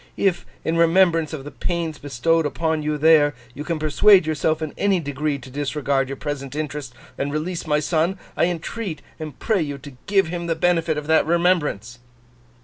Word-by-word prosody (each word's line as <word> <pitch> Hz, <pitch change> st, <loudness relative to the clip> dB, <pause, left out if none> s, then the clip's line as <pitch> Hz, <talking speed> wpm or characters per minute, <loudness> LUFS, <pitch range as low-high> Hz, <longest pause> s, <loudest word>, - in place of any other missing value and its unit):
If, 190 Hz, -3 st, +1 dB, 0.2 s
in 165 Hz, +1 st, 0 dB
remembrance 165 Hz, -1 st, +4 dB
of 155 Hz, -4 st, -6 dB
the 145 Hz, -, -8 dB
pains 170 Hz, -3 st, -3 dB
bestowed 145 Hz, +4 st, +1 dB
upon 160 Hz, +1 st, -1 dB
you 150 Hz, 0 st, -1 dB
there, 150 Hz, -1 st, +5 dB, 0.2 s
you 145 Hz, -, -6 dB
can 165 Hz, +1 st, -2 dB
persuade 165 Hz, +5 st, +5 dB
yourself 155 Hz, 0 st, 0 dB
in 155 Hz, -2 st, -4 dB
any 200 Hz, -2 st, +2 dB
degree 145 Hz, -1 st, -2 dB
to 130 Hz, -1 st, -12 dB
disregard 140 Hz, -1 st, -1 dB
your 135 Hz, -, -4 dB
present 140 Hz, -1 st, -5 dB
interest 150 Hz, -4 st, -4 dB, 0.2 s
and 140 Hz, +1 st, -1 dB
release 165 Hz, +3 st, -3 dB
my 150 Hz, -1 st, +2 dB
son, 165 Hz, +4 st, 0 dB, 0.2 s
I -, -, +3 dB
entreat 175 Hz, 0 st, -4 dB, 0.2 s
and 155 Hz, -4 st, -7 dB
pray 215 Hz, -5 st, +1 dB
you 145 Hz, -3 st, -3 dB
to 140 Hz, 0 st, -11 dB
give 195 Hz, -4 st, +3 dB
him 170 Hz, 0 st, -4 dB
the 165 Hz, -, 0 dB
benefit 165 Hz, -2 st, +1 dB
of 150 Hz, -, -4 dB
that 160 Hz, 0 st, +3 dB
remembrance. 160 Hz, -, +1 dB
155 Hz, 185 wpm, -22 LUFS, 145-170 Hz, 0.2 s, there